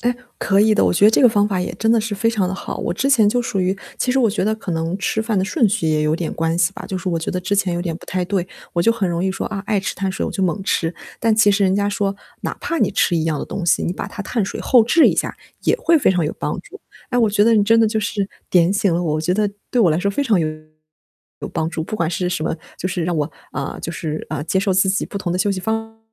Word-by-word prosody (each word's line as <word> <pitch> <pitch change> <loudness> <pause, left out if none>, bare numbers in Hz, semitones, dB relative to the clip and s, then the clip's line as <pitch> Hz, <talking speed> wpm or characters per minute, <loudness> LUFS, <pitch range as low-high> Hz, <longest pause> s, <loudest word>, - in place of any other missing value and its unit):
哎， 245 +1 +1 0.2
可 195 0 +2
以 215 0 +4
的， - - +3
我 - - +3
觉 195 - +3
得 215 - +8
这 - - +3
个 250 - +8
方 205 -2 +2
法 190 -3 -1
也 - - -3
真 225 +1 +2
的 230 - +3
是 215 -1 -4
非 225 +3 +1
常 205 -5 0
地 190 - -3
好。 - - -6
我 - - -2
之 265 +9 0
前 230 -7 +5
就 245 +3 +1
属 200 -5 -2
于 185 +2 0 0.2
其 250 - 0
实 265 - +2
我 235 -4 +4
觉 205 - -1
得 215 - +1
可 190 -5 -5
能 165 +3 -2
吃 220 +2 -1
饭 220 -2 0
的 185 - +1
顺 220 +2 +2
序 205 -4 -1
也 155 -1 +1
有 150 +1 +2
点 170 -1 -3
关 165 +1 -1
系 170 -2 +2
吧， - - -9
就 190 - -3
是 185 - -4
我 170 - 0
觉 160 - -3
得 180 - -2
之 190 +3 -1
前 195 -3 +1
有 175 - -2
点 170 -2 -3
不 - - -14
太 185 -1 -1
对。 190 -1 -1 0.3
我 170 - +1
就 230 - +4
很 220 -5 0
容 170 +1 -1
易 190 - +1
说， 190 - -4
啊， 195 -2 -4
爱 205 0 +1
吃 190 - -3
碳 190 0 -2
水 190 - -3
我 - - -3
就 190 - -2
猛 185 +2 0
吃， 165 -3 0 0.3
但 225 -1 +3
其 210 -2 +5
实 200 0 +1
人 185 - +3
家 205 0 +1
说， 200 -1 -1 0.3
哪 - - -3
怕 335 - -2
你 - - +2
吃 175 - +2
一 160 - 0
样 155 -2 0
的 - - -3
东 190 - -5
西， 170 - +2
你 175 - -1
把 - - -5
它 - - -8
碳 225 -1 -1
水 - - -5
后 245 -3 +5
置 315 +8 +5
一 - - +3
下， - - -2 0.3
也 - - +2
会 340 -9 +3
非 280 - +3
常 180 -4 +1
有 150 - -2
帮 - - -2
助。 - - -14 0.3
哎， 245 - +1
我 225 -3 +3
觉 205 0 +3
得 230 0 +5
你 210 - +4
真 225 +2 +4
的 225 - +5
就 220 0 0
是 205 -1 -2 0.2
点 175 0 +4
醒 200 -2 +1
了 170 - +1
我， 165 -4 -1
我 155 - 0
觉 175 +3 0
得 210 +1 +1 0.2
对 245 - +2
我 200 - +5
来 155 - +1
说 200 +2 +1
非 280 +8 -1
常 220 -7 +3
有 155 - 0 1.0
帮 160 +1 -1
助， 160 -2 -3
不 - - -5
管 165 -5 0
是 180 +1 -1
什 175 -3 -2
么 160 - -1 0.2
就 185 - -3
是 180 -3 -2
让 175 -1 -1
我， 150 +1 -1 0.2
呃 - - -4
就 165 - -5
是， 155 -2 -4
呃， 155 -2 -2
接 190 - 0
受 195 0 +1
自 185 +1 +3
己 195 +1 0
不 - - -8
同 175 -3 -2
的 180 - -1
休 200 +2 +1
息 190 -2 -2
方 225 +2 -3
195 Hz, 340 characters per minute, -20 LUFS, 175-220 Hz, 1.0 s, 得